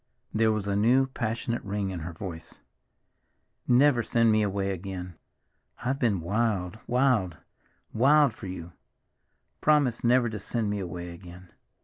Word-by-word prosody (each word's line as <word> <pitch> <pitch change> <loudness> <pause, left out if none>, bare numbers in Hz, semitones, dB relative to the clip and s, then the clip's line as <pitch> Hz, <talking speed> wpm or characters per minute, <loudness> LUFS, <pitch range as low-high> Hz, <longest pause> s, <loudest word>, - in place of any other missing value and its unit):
There 110 0 +3
was 105 -2 -2
a 100 -1 -1
new, 120 +6 +4
passionate 115 -2 -3
ring 100 -1 -2
in 90 - -5
her 80 +2 -6
voice. 85 -1 -8 1.1
"Never 125 0 +5
send 115 0 +2
me 110 0 +3
away 100 -1 -1
again. 90 -1 -6 0.7
I've 135 +2 0
been 105 -8 +1
wild, 100 0 -1
wild, 120 -9 +2 0.6
wild 140 +2 +4
for - - -9
you! 85 -2 -7 0.9
Promise 145 -6 +2
never 120 0 +4
to 110 -2 -5
send 110 -1 -2
me 105 - -2
away 90 -2 -6
again. 90 +1 -13
105 Hz, 140 wpm, -27 LUFS, 95-120 Hz, 1.1 s, Never